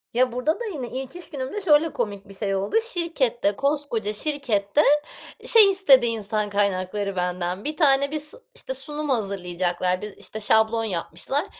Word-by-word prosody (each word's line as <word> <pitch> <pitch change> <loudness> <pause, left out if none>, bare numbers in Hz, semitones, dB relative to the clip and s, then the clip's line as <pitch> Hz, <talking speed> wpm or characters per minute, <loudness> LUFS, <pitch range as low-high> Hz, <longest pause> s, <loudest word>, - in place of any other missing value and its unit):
Ya 250 +1 +2
burada 250 - -1
da 480 - -4
yine 290 - -5
ilk 265 +3 -6
iş 355 -1 -10
günümde 285 +6 -5
şöyle 315 -3 +3
komik 205 -4 -4
bir 195 - -12
şey 195 0 -2
oldu: 195 - -2
Şirkette, 305 - 0
koskoca 275 -6 -1
şirkette, 255 -3 0 0.6
şey 440 -4 +7
istedi 280 -11 +5
insan 215 -2 -1
kaynakları 200 0 -1
benden, 180 +1 -2
bir 300 +1 -3
tane 280 -3 +3
bis 305 0 0 0.2
işte, 265 - -2
sunum 295 +3 -2
hazırlayacaklar, 185 -5 -1
bir 210 -1 -8
,işte, 220 - -7
şablon 220 +1 +3
yapmışlar. 195 - -2
235 Hz, 155 wpm, -24 LUFS, 200-295 Hz, 0.6 s, şey